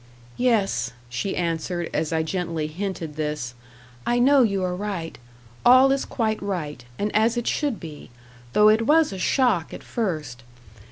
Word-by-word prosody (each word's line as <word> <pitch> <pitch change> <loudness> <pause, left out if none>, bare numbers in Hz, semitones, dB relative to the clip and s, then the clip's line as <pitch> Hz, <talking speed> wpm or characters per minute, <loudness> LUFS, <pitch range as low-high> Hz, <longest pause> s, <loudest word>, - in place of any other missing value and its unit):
"Yes," 210 - +1 0.2
she 125 +11 -3
answered, 170 0 -2
as 160 - -1
I 160 -1 +1
gently 165 -2 -2
hinted 165 -2 -5
this; 150 -5 -3 0.5
"I 240 - +1
know 270 +3 +5
you 200 -5 +1
are 180 -1 -1
right; 185 -4 -4 0.5
all 255 +2 +7
is 275 0 0
quite 220 -3 -1
right, 160 -10 -4
and 210 +1 -2
as 225 +2 +3
it 240 - -1
should 285 -7 -1
be, 155 -3 -10 0.4
though 210 0 +6
it 220 +1 +4
was 310 -6 +4
a 190 - -6
shock 215 - +1
at - - -10
first. 155 - -3
190 Hz, 160 wpm, -24 LUFS, 160-230 Hz, 0.5 s, all